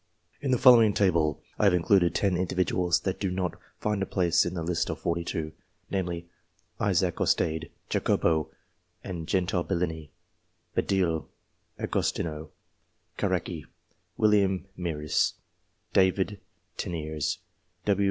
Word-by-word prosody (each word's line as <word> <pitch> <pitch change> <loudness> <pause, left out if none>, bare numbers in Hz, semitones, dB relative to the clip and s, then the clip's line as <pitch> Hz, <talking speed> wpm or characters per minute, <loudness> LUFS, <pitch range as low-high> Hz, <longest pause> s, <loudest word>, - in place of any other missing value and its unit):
In 140 - -2
the 130 - +4
following 115 -5 +7
table 85 -7 +2 0.2
I - - +3
have 95 -3 +5
included 90 0 +3
ten 100 -3 +2
individuals 90 -1 +1
that 95 -1 -2
do 95 - 0
not 90 -1 -2 0.2
find 105 -2 -1
a 100 - -1
place 90 -3 +2
in - - -4
the 85 - -2
list 85 0 -1
of - - -2
forty 85 0 -1
two: 80 -2 -3 0.4
namely, 85 -3 -2 0.5
Isaac 95 -5 +1
Ostade; 80 0 +1 0.2
Jacopo 80 -3 +1 0.5
and 85 -4 -5
Gentile 90 -1 +1
Bellini; 80 -4 -2 0.7
Badille, 85 -5 +1 0.5
Agos - - 0
tino 80 -1 -4 0.7
Caracci, - - -1 0.5
William 100 -4 +3
Mieris; 75 -4 0 0.6
David 95 +2 +2 0.4
Teniers; 80 -3 -2 0.5
W. 100 -1 +2
90 Hz, 125 wpm, -28 LUFS, 80-95 Hz, 0.7 s, following